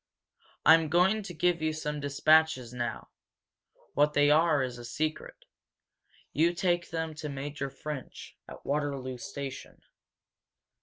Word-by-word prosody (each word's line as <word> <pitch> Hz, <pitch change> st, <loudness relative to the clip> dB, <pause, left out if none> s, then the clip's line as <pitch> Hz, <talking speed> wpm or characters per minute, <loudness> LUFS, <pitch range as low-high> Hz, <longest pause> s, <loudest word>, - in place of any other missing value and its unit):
I 160 Hz, -, +9 dB
am 165 Hz, -1 st, +3 dB
going 185 Hz, +6 st, +3 dB
to 195 Hz, -3 st, -8 dB
give 170 Hz, +1 st, +1 dB
you 155 Hz, 0 st, 0 dB
some 150 Hz, -1 st, -4 dB
dispatches 145 Hz, -2 st, +3 dB
now 120 Hz, -2 st, -4 dB, 0.8 s
what 150 Hz, +1 st, +3 dB
they 145 Hz, 0 st, +4 dB
are 155 Hz, -2 st, +4 dB
is 125 Hz, -1 st, -5 dB
a -, -, -9 dB
secret. 155 Hz, +6 st, -4 dB, 0.9 s
You 165 Hz, +3 st, +3 dB
take 175 Hz, -1 st, 0 dB
them 160 Hz, -1 st, -3 dB
to 150 Hz, 0 st, -6 dB
Major 140 Hz, 0 st, -4 dB
French, 140 Hz, +1 st, -8 dB
at -, -, -12 dB
Waterloo 140 Hz, -3 st, -2 dB
station." 140 Hz, +1 st, -7 dB
150 Hz, 135 wpm, -29 LUFS, 140-160 Hz, 0.9 s, I